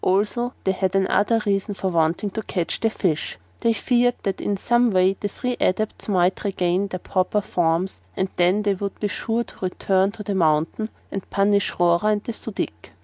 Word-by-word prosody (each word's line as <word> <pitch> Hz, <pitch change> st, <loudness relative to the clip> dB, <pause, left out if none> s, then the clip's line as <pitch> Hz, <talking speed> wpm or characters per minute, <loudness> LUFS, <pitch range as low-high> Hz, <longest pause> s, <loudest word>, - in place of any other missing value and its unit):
Also 210 Hz, +6 st, +1 dB
they 190 Hz, -, +2 dB
had 190 Hz, 0 st, -1 dB
another 205 Hz, +4 st, +3 dB
reason 200 Hz, 0 st, 0 dB
for 190 Hz, -, -1 dB
wanting 170 Hz, +4 st, +1 dB
to 220 Hz, -, -3 dB
catch 180 Hz, -5 st, -2 dB
the 225 Hz, -, +2 dB
fish 170 Hz, -, -1 dB, 0.2 s
they 230 Hz, -, +2 dB
feared 245 Hz, +2 st, +2 dB
that 195 Hz, -1 st, -2 dB
in 205 Hz, -, -1 dB
some 240 Hz, +4 st, +3 dB
way 190 Hz, -1 st, +3 dB
the 205 Hz, -, -1 dB
three 250 Hz, +5 st, -3 dB
Adepts 215 Hz, +4 st, 0 dB
might 185 Hz, -2 st, +2 dB
regain 185 Hz, -1 st, 0 dB
their 185 Hz, -, -4 dB
proper 185 Hz, +3 st, 0 dB
forms 175 Hz, -1 st, 0 dB, 0.2 s
and 190 Hz, -, +1 dB
then 180 Hz, +4 st, +3 dB
they 205 Hz, -1 st, +2 dB
would 200 Hz, +1 st, -5 dB
be 210 Hz, -, 0 dB
sure 225 Hz, +5 st, -1 dB
to -, -, -13 dB
return 190 Hz, +1 st, +1 dB
to 215 Hz, -, -7 dB
the 205 Hz, -, -2 dB
mountain 165 Hz, +4 st, +1 dB, 0.2 s
and 195 Hz, -2 st, -5 dB
punish 200 Hz, 0 st, +2 dB
Rora 175 Hz, +2 st, +3 dB
and 210 Hz, -1 st, +2 dB
the 235 Hz, -, -4 dB
Su 225 Hz, -, -7 dB
dic. -, -, -5 dB
195 Hz, 200 wpm, -23 LUFS, 185-210 Hz, 0.2 s, another